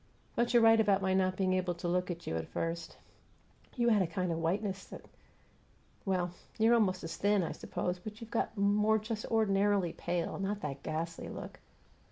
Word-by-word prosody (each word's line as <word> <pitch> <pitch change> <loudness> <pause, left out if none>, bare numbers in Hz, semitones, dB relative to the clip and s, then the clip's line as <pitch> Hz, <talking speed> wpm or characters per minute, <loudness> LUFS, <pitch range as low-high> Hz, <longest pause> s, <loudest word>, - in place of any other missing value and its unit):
But 235 0 +1
you're 240 -1 +5
right 225 0 +7
about 200 -3 +3
my 190 0 +2
not 185 -1 +2
being 185 -1 +2
able 185 -1 0
to 175 - -4
look 180 +1 0
at 170 -1 -5
you 80 - -2
at 80 0 -3
first. 165 0 -4 0.8
You 240 -1 +3
had 215 -3 +4
a 185 - +1
kind 180 -1 -2
of 165 - -1
whiteness 190 +4 -1
that - - -10 1.0
Well, 180 -3 0 0.3
you're 225 +1 +5
almost 190 -6 +2
as 165 - -5
thin, 205 -1 +2
I 165 - -2
suppose, 180 0 -3
but 210 +3 -8
you've 230 -1 -10
got 230 - -1
more 210 +2 +3
just 215 0 -4
ordinarily 200 -4 +2
pale; 175 +1 -2
not 200 +1 -2
that 140 -2 -4
ghastly 165 +1 -4
look. - - -8
190 Hz, 195 wpm, -32 LUFS, 175-210 Hz, 1.0 s, right